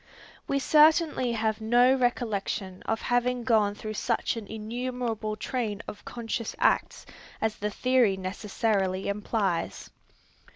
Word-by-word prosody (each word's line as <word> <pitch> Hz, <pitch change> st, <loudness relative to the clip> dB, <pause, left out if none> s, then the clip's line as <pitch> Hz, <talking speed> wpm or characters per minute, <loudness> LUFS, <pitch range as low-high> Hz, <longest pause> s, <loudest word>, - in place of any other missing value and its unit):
We 275 Hz, -, +1 dB
certainly 300 Hz, -3 st, +4 dB
have 220 Hz, -1 st, -1 dB
no 240 Hz, +3 st, +5 dB
recollection 215 Hz, -6 st, -1 dB
of 225 Hz, 0 st, 0 dB
having 245 Hz, 0 st, +1 dB
gone 215 Hz, -4 st, +2 dB
through 215 Hz, +1 st, -6 dB
such 230 Hz, +2 st, -1 dB
an 225 Hz, -3 st, -7 dB
innumerable 225 Hz, 0 st, -3 dB
train 215 Hz, -2 st, -3 dB
of 205 Hz, -, -8 dB
conscious 230 Hz, -1 st, -4 dB
acts -, -, +1 dB, 0.3 s
as 220 Hz, -1 st, -1 dB
the 210 Hz, -, -2 dB
theory 245 Hz, -3 st, +2 dB
necessarily 190 Hz, 0 st, -1 dB
implies. 200 Hz, -3 st, -2 dB
225 Hz, 120 wpm, -27 LUFS, 205-245 Hz, 0.3 s, no